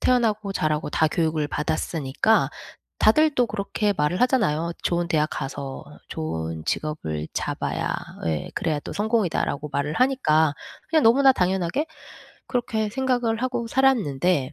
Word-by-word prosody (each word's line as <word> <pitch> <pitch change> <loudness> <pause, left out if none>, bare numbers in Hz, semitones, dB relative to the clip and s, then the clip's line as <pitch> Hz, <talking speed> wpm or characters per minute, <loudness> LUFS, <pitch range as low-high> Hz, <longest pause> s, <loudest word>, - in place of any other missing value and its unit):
태어나고 220 -5 +1
자라고 155 -3 0
다 160 - +2
교육을 155 -2 0
받았으니까 155 +6 0 0.5
다들 305 +7 +4
또 245 -1 +3
그렇게 205 0 -1
말을 150 +7 0
하잖아요. 170 - +2
"좋은 175 0 0
대학 155 -2 +2
가서 135 0 -5 0.2
좋은 80 0 -4
직업을 80 - -3
잡아야 - - -2 0.4
예 80 -2 -2
그래야 155 -3 -1
또 - - -7
성공이다."라고 205 -9 0
말을 145 +2 -1
하니까. 160 - +3 0.4
그냥 315 -1 +4
너무나 265 +4 +6
당연하게 185 - 0 0.6
그렇게 220 -4 -1
생각을 245 -1 0
하고 245 -2 -1
살았는데 180 - +2
180 Hz, 325 characters per minute, -24 LUFS, 150-235 Hz, 0.6 s, 너무나